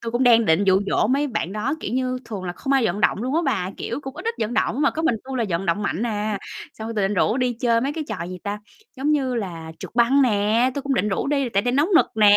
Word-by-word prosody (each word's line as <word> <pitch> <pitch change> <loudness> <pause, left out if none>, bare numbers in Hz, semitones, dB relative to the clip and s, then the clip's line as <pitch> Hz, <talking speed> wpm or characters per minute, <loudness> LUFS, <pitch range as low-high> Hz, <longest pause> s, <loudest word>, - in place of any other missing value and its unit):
Tui 230 0 -5
cũng 240 - +1
đang 230 -2 +6
định 175 +2 +3
dụ 190 0 +4
dỗ - - +2
mấy 280 +4 +1
bạn 195 -8 -3
đó, 220 +7 -1
kiểu - - -4
như, 255 0 -1
thường 210 -5 -6
là 175 - -3
không 270 +9 -3
ai 270 -4 +3
vận 200 +2 -2
động - - +3
luôn 260 +4 -2
á 330 - +3
bà, 200 -9 0
kiểu, 235 +5 -4
cũng 270 -2 -8
ít - - -8
ít 460 +1 -1
vận 225 +3 -1
động 265 - 0
mà 285 - +4
có 320 - -4
mình 280 -8 +2
tui 265 0 -5
là 235 - +1
vận 170 +2 -2
động 170 +5 0
mạnh 195 0 -1
à, 210 -1 -2 0.4
xong 220 0 -6
tui 210 - 0
định 210 - -2
rủ 210 +5 +2
đi 250 -1 +1
chơi 235 -2 +3
mấy 275 +4 -1
cái 315 -1 -4
trò, 200 -6 -4
gì 185 - -7
ta, 205 0 -3 0.4
giống 275 +3 0
như 265 -4 0
là 170 -7 -5
trượt - - -8
băng 245 +4 +4
nè, 225 +2 +2
tui 280 - -3
cũng 280 -1 0
định 210 - +1
rủ 195 - -1
đi 280 -2 +1
tại 200 -3 +1
đây 245 - 0
nóng 290 +6 +2
nực - - +5
nè, 205 -1 +7
235 Hz, 300 wpm, -23 LUFS, 205-265 Hz, 0.4 s, nè